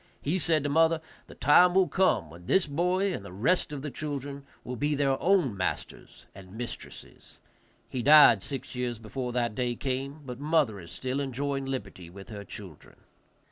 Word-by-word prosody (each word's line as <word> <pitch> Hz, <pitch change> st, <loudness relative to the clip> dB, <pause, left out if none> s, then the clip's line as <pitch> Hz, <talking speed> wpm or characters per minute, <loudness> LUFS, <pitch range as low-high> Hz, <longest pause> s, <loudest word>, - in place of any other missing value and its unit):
He 165 Hz, +6 st, -1 dB
said 160 Hz, -3 st, +1 dB
to -, -, 0 dB
mother, 165 Hz, +1 st, +4 dB, 0.3 s
"The -, -, -13 dB
time 175 Hz, +6 st, +5 dB
will 190 Hz, -1 st, +5 dB
come 145 Hz, -, +1 dB
when 85 Hz, +2 st, -13 dB
this 190 Hz, -, +3 dB
boy 180 Hz, +6 st, 0 dB
and 100 Hz, -, -5 dB
the 100 Hz, -, -10 dB
rest 130 Hz, -, +1 dB
of 140 Hz, -2 st, -6 dB
the 150 Hz, -, -4 dB
children 140 Hz, 0 st, -5 dB, 0.2 s
will 125 Hz, -, -5 dB
be 145 Hz, +5 st, 0 dB
their 140 Hz, -1 st, +1 dB
own 175 Hz, -, +3 dB
masters 95 Hz, -1 st, -5 dB
and 95 Hz, +2 st, -12 dB
mistresses." 120 Hz, 0 st, -9 dB, 0.5 s
He 125 Hz, -, -4 dB
died 145 Hz, -6 st, +8 dB
six 135 Hz, +6 st, -5 dB
years 125 Hz, -2 st, -3 dB
before 125 Hz, +3 st, -5 dB
that 120 Hz, -2 st, 0 dB
day 120 Hz, +1 st, -1 dB
came, 135 Hz, +4 st, -4 dB
but 125 Hz, -1 st, -7 dB
mother 145 Hz, -8 st, +1 dB
is 85 Hz, -2 st, -11 dB
still 130 Hz, +7 st, -3 dB
enjoying 135 Hz, 0 st, -2 dB
liberty 100 Hz, -9 st, -6 dB
with 95 Hz, +5 st, -12 dB
her 105 Hz, -2 st, -7 dB
children. 95 Hz, -6 st, -11 dB
135 Hz, 180 wpm, -28 LUFS, 115-150 Hz, 0.5 s, died